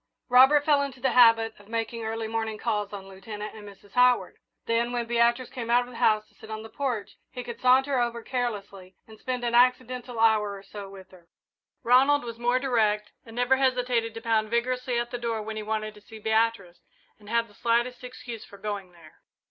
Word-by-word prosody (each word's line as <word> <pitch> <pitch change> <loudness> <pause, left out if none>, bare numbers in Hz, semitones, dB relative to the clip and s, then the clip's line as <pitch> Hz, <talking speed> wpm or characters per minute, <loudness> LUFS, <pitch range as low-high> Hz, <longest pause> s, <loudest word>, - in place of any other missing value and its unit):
Robert 265 +4 +6
fell 290 -2 +4
into 275 -2 -4
the 260 0 +1
habit 225 -2 +5
of 205 - -18
making 230 0 -3
early 225 0 -3
morning 220 -1 -3
calls 210 -1 -2
on 195 -2 -8
Lieutenant 210 +2 -8
and 210 -2 -10
Mrs. 200 0 -18
Howard. 250 +1 +3 0.3
Then, 235 +1 0
when 240 -1 -2
Beatrice 235 +1 +1
came 235 -2 -6
out 240 +1 +4
of 245 - -12
the 235 - -10
house 215 -1 +3
to - - -30
sit 220 - -14
on 220 0 -5
the 220 - -10
porch, 250 -7 -3
he 250 - -7
could 235 -1 -8
saunter 260 +1 +4
over 235 -1 -1
carelessly 200 -7 -4
and 220 -1 -15
spend 250 -1 -3
an 235 - -1
accidental 250 0 +2
hour 215 -2 +3
or 195 - -11
so 200 0 -9
with 190 -1 -13
her. 175 -2 -18 0.6
Ronald 270 +4 +4
was 230 -1 -7
more 245 +1 +2
direct 215 -5 +1 0.2
and 225 - -11
never 245 +2 +3
hesitated 250 -3 0
to 225 - -6
pound 220 -2 +1
vigorously 250 +1 -1
at 240 0 -2
the 245 - -4
door 230 -2 -2
when 220 +1 -6
he 215 - -4
wanted 215 0 -3
to 210 - -16
see 220 +2 -12
Beatrice 220 -4 0 0.4
and 205 -1 -14
had 230 0 +1
the 205 - -21
slightest 240 +3 0
excuse 245 -2 -8
for 200 - -14
going 200 -3 -5
there. 165 -3 -18
230 Hz, 210 wpm, -26 LUFS, 215-245 Hz, 0.6 s, Robert